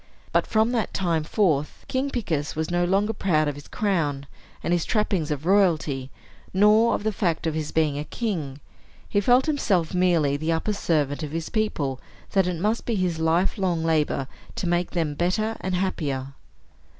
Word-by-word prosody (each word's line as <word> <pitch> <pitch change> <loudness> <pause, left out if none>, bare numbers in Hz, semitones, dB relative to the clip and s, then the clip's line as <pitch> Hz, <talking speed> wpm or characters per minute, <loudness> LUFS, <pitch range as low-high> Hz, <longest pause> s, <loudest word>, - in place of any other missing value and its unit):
But - - +2
from 220 +2 +2
that 230 -4 -1
time 170 -4 +1
forth, 155 -5 0
King 265 +2 -1
Picus 165 - -2
was 160 +2 -2
no 175 0 +2
longer 200 +4 +1
proud 160 -7 +1
of 145 - -1
his 145 0 -11
crown 155 -9 -1 0.4
and 170 - +1
his 175 -2 +1
trappings 195 -8 0
of 150 0 -3
royalty, 160 -9 +2 0.5
nor 210 +4 +5
of - - -4
the 215 - +1
fact 175 -5 -1
of 160 - 0
his 155 -1 -3
being 150 -3 +1
a - - -2
king; 155 - -3 0.5
he 205 - +1
felt 245 +5 +4
himself 200 - +1
merely 170 -6 +2
the 160 +3 0
upper 165 +6 -1
servant 150 -7 0
of 155 - -4
his 165 +2 -4
people, 145 - -1
and - - -25
that 195 -2 +3
it 175 -2 -3
must 215 +5 -1
be 235 - +1
his 180 -4 0
life 170 +6 +1
long 175 -4 0
labor 155 -4 +1 0.3
to 185 - -2
make 175 +1 +1
them 160 -4 -1
better 200 +8 0
and 185 -1 -1
happier. 140 -8 -2
175 Hz, 185 wpm, -25 LUFS, 155-205 Hz, 0.5 s, nor